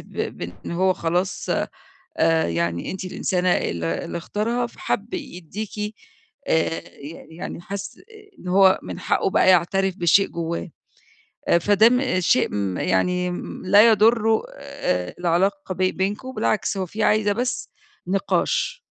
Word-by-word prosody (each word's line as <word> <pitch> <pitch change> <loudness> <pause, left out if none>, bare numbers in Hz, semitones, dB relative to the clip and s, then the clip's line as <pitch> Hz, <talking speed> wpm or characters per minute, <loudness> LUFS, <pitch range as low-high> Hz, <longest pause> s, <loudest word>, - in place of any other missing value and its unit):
ب - - -15 0.3
بإن 90 - -7
هو 185 +2 +2
خلاص 175 +2 -2 0.7
آآ، 160 - +3
يعني 85 0 -2
أنتِ 190 - -5
الإنسانة 185 0 -1
ال 85 - -1
اللي 85 - -3
اختارها 230 +7 -2
فحَب 305 +9 -4
يديكِ، 210 - -6 0.5
آآ، 160 0 +1
ي 145 +4 -11
يعني 170 - -6
حَس 200 +2 -7 0.4
إن 180 - -9
هو 190 0 +5
من - - -7
حَقُّه - - +1
بقى 190 - +3
يعترف 185 +1 +2
بشيء 175 +2 +4
جوّاه. 170 +1 -4 0.9
فده 205 +4 +5
م 250 -7 +1
شيء 130 - +3
ما 100 -3 -2
يعني 180 - +1 0.3
لا 205 +4 +7
يضر 220 0 +4 0.8
العلاقة 185 +3 0
بي 185 +1 +1
بينكم 205 +7 -3
بالعكس 215 -2 0
هو 190 -1 -2
في 215 +5 -4
عايزة 210 -1 +3
بس 245 +4 -2 0.4
نِقاش، 470 - 0
185 Hz, 130 wpm, -23 LUFS, 170-210 Hz, 0.9 s, لا